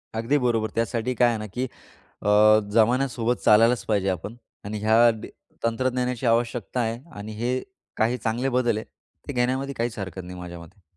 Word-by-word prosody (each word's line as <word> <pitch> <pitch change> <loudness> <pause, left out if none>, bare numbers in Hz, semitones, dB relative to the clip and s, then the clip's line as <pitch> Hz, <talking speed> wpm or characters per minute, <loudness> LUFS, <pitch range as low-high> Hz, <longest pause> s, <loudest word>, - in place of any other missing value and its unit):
अगदी 115 +6 +1
बरोबर. 115 -4 +1
त्यासाठी 115 +2 -1
काय 120 0 +4
आहे 115 - -1
ना 110 - -5
की 125 +1 0 0.6
अ, 105 - 0 0.4
जमान्यासोबत 120 +1 +2
चालायलाच 115 +3 +5
पाहिजे 100 -3 +1
आपण 95 +5 -4 0.3
आणि 105 +1 -4
ह्या 110 +3 +5
दे 110 -2 -8 0.3
तंत्रज्ञानाची 125 +1 -1
आवश्यकता 120 +1 0
आहे 115 0 -1 0.2
आणि 105 +2 -7
हे 120 +1 0 0.5
काही 115 +3 +1
चांगले 120 +3 -1
बदल 120 -3 +1
आहेत, 110 - -5 0.4
ते 145 - -4
घेण्यामध्ये 130 +2 0
काहीच 120 0 -2
हरकत 95 -1 -5
नाही 90 0 -9
माझ्यामते. 85 +2 -10
115 Hz, 165 wpm, -25 LUFS, 110-125 Hz, 0.6 s, चालायलाच